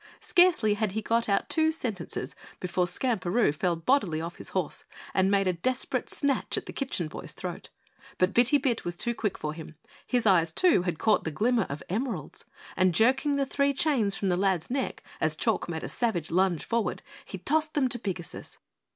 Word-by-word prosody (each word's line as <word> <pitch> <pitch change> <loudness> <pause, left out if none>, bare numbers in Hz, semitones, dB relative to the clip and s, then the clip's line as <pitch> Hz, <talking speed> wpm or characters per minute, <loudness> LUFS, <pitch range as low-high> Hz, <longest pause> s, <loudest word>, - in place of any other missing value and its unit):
Scarcely 350 - +4
had 210 -2 -1
he 220 - -1
got 230 +1 +1
out 200 - +1
two 315 -1 +2
sentences 225 - -4 0.2
before 180 0 0
Skamperoo 205 - +1
fell 175 +3 0
bodily 165 - +1
off 165 +1 -6
his - - -7
horse 185 -5 -3 0.3
and 190 0 +3
made 200 -1 +3
a 185 - +2
desperate 250 +10 -2
snatch 280 -2 0
at - - -3
the - - -8
Kitchen 255 - -2
Boy's - - -8
throat. - - -6 0.5
But 185 +1 +2
Bitty 245 +4 +5
Bit 260 -5 -1
was 175 0 -4
too 235 +5 0
quick 215 -4 -2
for 150 0 -4
him. 160 0 -10 0.3
His 245 -2 +1
eyes, 170 -5 +4
too, 345 - +4
had 175 -3 -2
caught 215 +4 +2
the - - -2
glimmer 225 +6 +1
of 140 +2 -5
emeralds, 200 - -4 0.3
and 185 -2 +3
jerking 265 - +3
the 280 -1 +1
three 280 +1 +1
chains 245 -10 +1
from 195 - -1
the 175 - +2
lad's 190 -1 0
neck 265 0 -2 0.2
as - - +1
Chalk - - 0
made - - -4
a - - -3
savage 195 -10 -1
lunge 180 -2 +1
forward, 230 -5 -1 0.2
he 190 - -7
tossed 310 - +1
them 280 -3 +3
to 240 - -3
Pigasus. 185 -6 -6
205 Hz, 195 wpm, -28 LUFS, 175-255 Hz, 0.5 s, Bitty